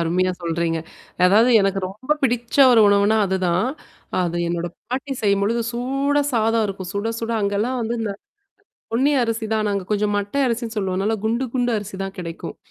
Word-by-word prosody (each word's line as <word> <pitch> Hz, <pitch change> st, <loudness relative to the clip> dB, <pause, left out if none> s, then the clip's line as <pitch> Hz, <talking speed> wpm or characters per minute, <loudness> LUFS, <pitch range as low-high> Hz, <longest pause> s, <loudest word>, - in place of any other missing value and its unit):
அருமையா 180 Hz, +3 st, +1 dB
சொல்றீங்க. 165 Hz, 0 st, -1 dB, 0.5 s
அதாவது 220 Hz, +6 st, +5 dB
எனக்கு 195 Hz, 0 st, +1 dB
ரொம்ப 220 Hz, +10 st, -2 dB
பிடிச்ச 240 Hz, -2 st, 0 dB, 0.2 s
ஒரு 230 Hz, -, +6 dB
உணவுனா 200 Hz, +2 st, +4 dB
அதுதான். 185 Hz, +1 st, +1 dB, 0.5 s
அது 175 Hz, -1 st, -1 dB
என்னோட 170 Hz, 0 st, -2 dB, 0.2 s
பாட்டி 265 Hz, +2 st, -3 dB
செய்யும்பொழுது 205 Hz, +3 st, +1 dB
சூடா 275 Hz, +4 st, 0 dB
சாதம் 225 Hz, -1 st, +2 dB
இருக்கும். 190 Hz, -2 st, -6 dB
சுட, 200 Hz, +2 st, -1 dB
சுட 230 Hz, 0 st, -2 dB
அங்கலாம் 205 Hz, +5 st, 0 dB
வந்து 230 Hz, +1 st, -2 dB
இந்த, 215 Hz, -3 st, -2 dB, 0.8 s
பொன்னி 260 Hz, +5 st, +3 dB
அரிசி 230 Hz, -1 st, -2 dB
தான் 215 Hz, -1 st, +1 dB
நாங்க 200 Hz, -1 st, -1 dB
கொஞ்சம் 210 Hz, 0 st, +1 dB
மட்டை 205 Hz, +6 st, -2 dB
அரிசின்னு 235 Hz, -1 st, -2 dB
சொல்லுவோம்னால 195 Hz, +2 st, 0 dB
குண்டு, 230 Hz, +4 st, 0 dB
குண்டு 245 Hz, -1 st, +1 dB
அரிசி 205 Hz, -1 st, -7 dB
தான் 195 Hz, 0 st, -7 dB
கிடைக்கும். 170 Hz, -2 st, -6 dB
210 Hz, 160 wpm, -21 LUFS, 195-235 Hz, 0.8 s, ஒரு